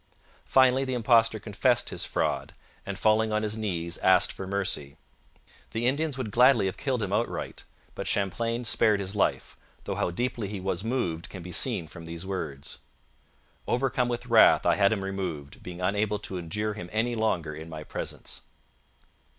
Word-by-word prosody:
Finally, 130 0 +5
the 130 -1 -2
impostor 115 -1 +4
confessed 100 -1 +1
his - - -3
fraud - - -1 0.3
and, 100 -1 -3
falling 110 +2 +3
on 105 0 0
his 105 0 -1
knees, 85 -6 -3
asked 95 -1 +4
for 95 - -7
mercy. 95 -7 -1 0.8
The 115 +1 -1
Indians 145 +2 +1
would 120 -5 -3
gladly 125 -1 +5
have 95 +1 -1
killed 125 0 -1
him 100 -1 -2
outright, 115 +3 -2 0.3
but - - -5
Champlain 115 +5 -1
spared 110 -2 +3
his 100 +1 -4
life, 105 - 0 0.3
though - - -3
how - - 0
deeply 115 +3 -2
he 100 0 -5
was 95 -1 -2
moved 100 -9 -2
can 90 -3 -8
be 90 - -8
seen 80 - 0
from 85 +1 -10
these 85 +2 -6
words: 80 -8 -5 0.9
'Overcome 125 0 +1
with 120 0 -3
wrath 115 -2 +6
I - - +5
had 100 0 +4
him 105 -3 -1
removed, 90 -7 -5
being 90 0 -8
unable 105 +3 +1
to 95 -2 -4
endure 105 +6 -2
him 90 -4 -8
any 115 +3 0
longer 95 -9 0
in 80 +2 -8
my 80 -1 -7
presence.' - - -6
105 Hz, 175 wpm, -27 LUFS, 90-115 Hz, 0.9 s, wrath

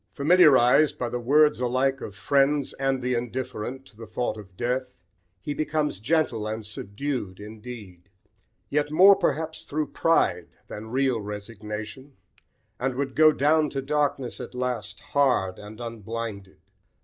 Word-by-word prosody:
Familiarised, 150 -3 +5
by 125 - -2
the 125 - -3
words 150 +5 +4
alike 130 +2 0
of 100 - -7
friends 140 +3 +2
and 135 -1 0
the 125 0 0
indifferent, 125 +1 -4
to 115 - -20
the 115 +1 -10
thought 125 - -2
of 95 -4 -13
death, 125 -5 -3 0.4
he 145 - -3
becomes 150 -7 -1
gentle 120 -3 0
and 110 0 -4
subdued 105 0 -5
indeed, 105 -4 -10 0.6
yet 145 0 +1
more 185 +6 +7
perhaps 160 -1 -1
through 155 -1 -2
pride 90 - +1 0.2
than 110 +1 -8
real 130 -2 +1
resignation, 105 +5 -7 0.7
and 130 0 -1
would 135 0 -3
go 155 0 +7
down 150 +1 +2
to 135 - -3
darkness 140 -2 -1
at - - -8
last 120 -6 -3
hard 125 -10 +1
and 105 +2 -11
unblinded. 115 -3 -6
125 Hz, 140 wpm, -26 LUFS, 110-145 Hz, 0.7 s, more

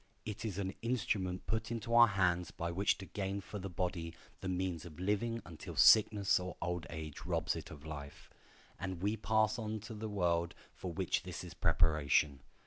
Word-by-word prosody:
It 105 +1 -5
is 105 -5 -3
an 95 -1 -2
instrument 105 -6 -1
put 110 0 -1
into 115 0 -3
our 120 0 +9
hands 90 -4 +1
by 85 0 -3
which 95 +4 +2
to 95 - -8
gain 100 0 -3
for 100 +2 -7
the 95 +1 -5
body 85 -2 -3 0.2
the 95 - -4
means 90 -3 -1
of 85 -2 -11
living 105 +5 0
until 80 -3 -8
sickness 105 -3 +6
or 90 -1 -6
old 90 -1 -2
age 80 -2 -6
robs - - 0
it - - -6
of 75 -1 -11
life, 70 -2 -8 0.5
and 95 -2 -4
we 105 +2 +2
pass 110 +1 +2
on 110 -1 -3
to 105 +2 -8
the 110 0 -5
world 85 -4 +1 0.2
for 90 - -5
which 80 - 0
this - - -6
is - - -8
a - - -26
preparation. 75 -4 +3
95 Hz, 195 wpm, -35 LUFS, 85-105 Hz, 0.5 s, our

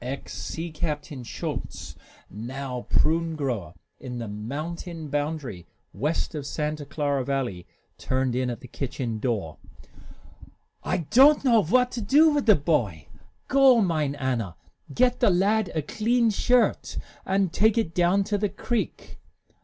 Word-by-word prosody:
Ex 135 +2 -5
Sea 165 +1 -5
Captain 150 -3 -4
Schulz, 115 - -6 0.3
now 125 +3 -6
prune 165 +1 +2
grower 120 - -3 0.2
in 125 -2 -6
the 115 -1 -4
mountain 155 - -5
boundary 145 - -3 0.3
west 155 +4 -1
of 145 -3 -5
Santa 150 -1 -3
Clara 145 -3 -1
Valley, 125 -10 -3 0.3
turned 130 -1 0
in 125 0 0
at 120 - -5
the 125 - -10
kitchen 120 -3 -4
door. 105 -10 -2 1.2
"I 165 - -1
don't 280 +3 +6
know 230 -4 +5
what 250 +8 +3
to 240 - -4
do 295 +9 +5
wit' 290 -4 0
the 215 - +8
boy. 115 - -1 0.4
Go, 265 -2 +6
mine 155 -8 +1
Anna, 125 -9 -2 0.4
get 245 - +2
the 235 - +4
lad 195 +2 +2
a 155 - 0
clean 230 - +1
shirt, 245 +4 +1 0.3
and 190 -2 0
take 220 +3 +3
it 195 -8 0
down 180 +3 +3
to 205 +1 -1
the 205 0 0
creek." 225 +4 -4
155 Hz, 145 wpm, -26 LUFS, 130-200 Hz, 1.2 s, the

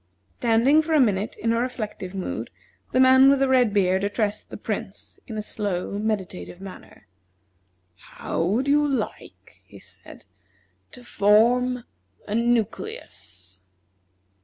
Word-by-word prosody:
Standing 245 +6 +4
for 320 +1 -3
a - - +5
minute 210 -4 +1
in 230 0 -1
a 230 - +1
reflective 215 -6 -5
mood, 190 - -4 0.4
the 255 - +1
man 260 +1 +7
with 280 - +4
the 270 0 +2
red 255 -4 +3
beard 190 -1 +1
addressed 205 0 -2
the - - -8
Prince - - -6
in 225 -4 -6
a 215 - -3
slow, 200 -2 -3
meditative 195 -4 -4
manner: 190 -1 -12 0.9
"How 90 - -5
would 215 +11 0
you 295 +1 +4
like," 275 -3 -5
he - - -16
said, - - -12 0.7
"to 250 - -12
form 240 +4 +3 0.4
a 205 - -4
nucleus?" 215 - -3
220 Hz, 135 wpm, -24 LUFS, 200-250 Hz, 0.9 s, man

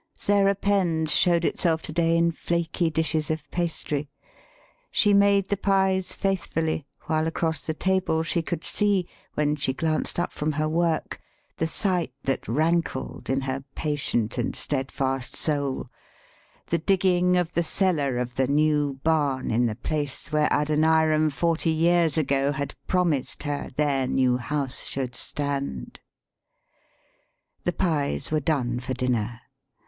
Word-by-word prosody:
Sarah 200 -1 +2
Penn's 175 -6 +1
showed 170 -1 +3
itself 165 -3 +1
to - - -3
day 165 +1 +2
in 170 0 +3
flaky 170 0 -1
dishes 160 -1 0
of 155 -2 -3
pastry.] 150 -4 -2 0.8
She 205 -2 +3
made 200 -1 +4
the 200 - +1
pies 190 -1 +1
faithfully, 165 -6 -1 0.2
while 155 0 0
across 160 -2 -1
the 160 - -1
table 185 -3 +1
she 170 +1 0
could 165 0 -4
see, 200 -4 +1 0.3
when 150 0 +1
she 140 -2 -1
glanced 155 +2 -1
up 175 - -1
from 150 +1 -2
her 155 +1 0
work, 165 0 0 0.4
the 160 - 0
sight 180 - 0
that 135 - -1
rankled 160 +2 -1
in 135 +1 +1
her 135 0 -3
patient 130 -6 -1
and 120 - -1
steadfast 135 -2 -2
soul 140 -3 -1 0.8
the 170 - +2
digging 180 0 +3
of 175 -1 0
the 170 - +2
cellar 160 -7 +1
of 125 0 -2
the 130 +1 +1
new 145 -1 +2
barn 145 -5 +1
in 120 +2 +2
the 110 - -3
place 145 +4 -3
where 150 0 +3
Adoniram 155 +1 +3
forty 165 +3 0
years 165 -1 +3
ago 140 -2 +2
had 140 0 -3
promised 170 -8 0
her 145 -1 -3
their 140 -3 +1
new 125 -1 +2
house 135 +1 -2
should 130 -3 -4
stand. 140 - -4 1.7
The 175 - +1
pies 155 -7 -1
were 155 - +2
done 130 -5 0
for 130 +1 -4
dinner. 120 -2 -1
155 Hz, 145 wpm, -25 LUFS, 140-170 Hz, 1.7 s, made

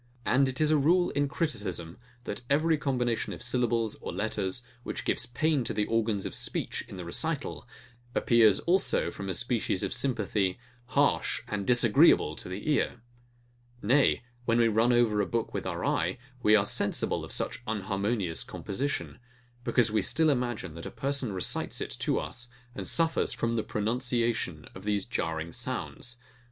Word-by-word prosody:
And 135 +1 +3
it 130 - -4
is 155 0 +3
a 155 - +4
rule 175 +5 +3
in 145 0 +1
criticism, 105 - -3 0.2
that - - -5
every 155 +3 +3
combination 125 -5 -1
of - - -8
syllables 120 -2 +1
or - - -4
letters, 105 0 -2 0.2
which - - -5
gives 120 - 0
pain 140 +3 +1
to - - -2
the 105 0 +1
organs 110 -3 0
of - - -4
speech - - -2
in - - -9
the 90 - -6
recital, 145 - -2 0.5
appears 110 -4 +5
also 185 +3 +2
from 100 -1 -6
a 95 - -1
species 115 -4 0
of 100 - -1
sympathy 105 -7 0 0.3
harsh - - +1
and 100 -2 -3
disagreeable 120 - +5
to - - -7
the 95 +8 -6
ear. 120 -5 0 0.8
Nay, 130 +4 +3 0.2
when 115 0 +2
we 115 -1 +5
run 115 +3 +3
over 115 -4 +3
a 100 - -1
book 115 -1 -2
with - - -3
our - - -3
eye, 90 +3 0 0.2
we 105 -1 +6
are 100 -2 +4
sensible - - +1
of - - -8
such - - -2
unharmonious 100 -3 -1
composition; 135 +8 -4 0.4
because 120 -2 +3
we 110 -1 +2
still 160 +9 +3
imagine, 120 - -2
that 85 +1 -7
a - - -5
person 140 -4 -2
recites 95 -2 -1
it - - -3
to - - +1
us, 120 -1 -3 0.3
and 100 -5 -6
suffers 165 -1 +2
from 115 0 -1
the 115 - +1
pronunciation 115 - -1
of 95 - -10
these 105 -2 0
jarring 80 -7 -3
sounds. 120 0 -3
115 Hz, 170 wpm, -29 LUFS, 100-130 Hz, 0.8 s, we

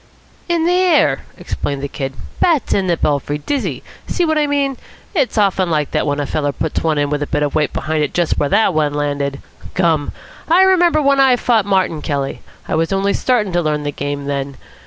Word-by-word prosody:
"In 335 -1 +1
the 350 - +3
air," 360 -3 +3
explained 140 -1 -4
the - - -1
Kid. 135 -1 -5 0.3
"Bats 325 -6 +2
in 195 -2 +1
the 170 -2 +1
belfry. 145 0 0
Dizzy. 275 - -3 0.2
See 355 - 0
what 315 -1 +1
I 295 - +2
mean? 280 -2 0 0.4
It's 280 - 0
often 195 -3 +2
like 150 -3 0
that - - 0
when 145 0 0
a 145 - -1
feller 145 0 -1
puts 155 +2 -3
one 160 -2 +1
in 145 0 0
with 150 0 -1
a 145 - -2
bit 150 -1 0
of 145 - -1
weight 150 -2 +1
behind 155 -1 -1
it 145 - -2
just 175 -2 0
where 145 - +1
that 205 +4 +3
one 150 -2 0
landed. 145 -1 -2 0.3
Gum! 165 -5 +1 0.4
I 355 +3 +6
remember 350 -5 +4
when 275 0 +3
I 265 -2 +6
fought 230 -4 +1
Martin 190 -5 +1
Kelly; 140 -2 -3 0.3
I - - -3
was 165 +2 0
only 195 +1 +1
starting 220 -7 0
to 175 - +2
learn 150 -2 -1
the 145 - -2
game 145 0 -4
then. 140 -1 -3
165 Hz, 220 wpm, -18 LUFS, -, 0.4 s, I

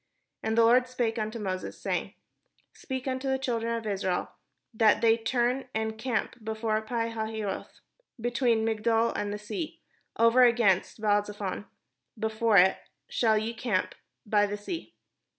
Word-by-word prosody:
And 220 +1 -1
the 230 - +6
Lord 250 +2 +5
spake 240 -2 -1
unto 215 +2 -3
Moses, 190 -4 -4
saying: - - -2 0.6
"Speak 260 -1 -5
unto 260 +1 -2
the 265 - +2
children 230 -3 -1
of 230 -1 -5
Israel, 190 -3 -1 0.4
that 220 -1 +4
they 225 -1 +5
turn 245 +3 0
and 220 0 0
encamp 225 0 -3
before 220 0 -1
Pi 230 +1 -2
hahiroth, 220 -3 -4 0.4
between 235 -1 +1
Migdol 225 +1 +1
and 205 - -2
the 205 - -3
sea, 295 - -5 0.4
over 230 +2 +5
against 230 -6 +3
Baal 205 -1 +3
zephon; 205 -1 -5 0.5
before 220 0 +2
it 190 +1 +5 0.3
shall 220 -2 +2
ye 220 +2 -1
encamp 225 -5 -1 0.3
by 205 -1 +3
the 205 +1 -4
sea. 325 - -6
225 Hz, 150 wpm, -28 LUFS, 210-240 Hz, 0.6 s, the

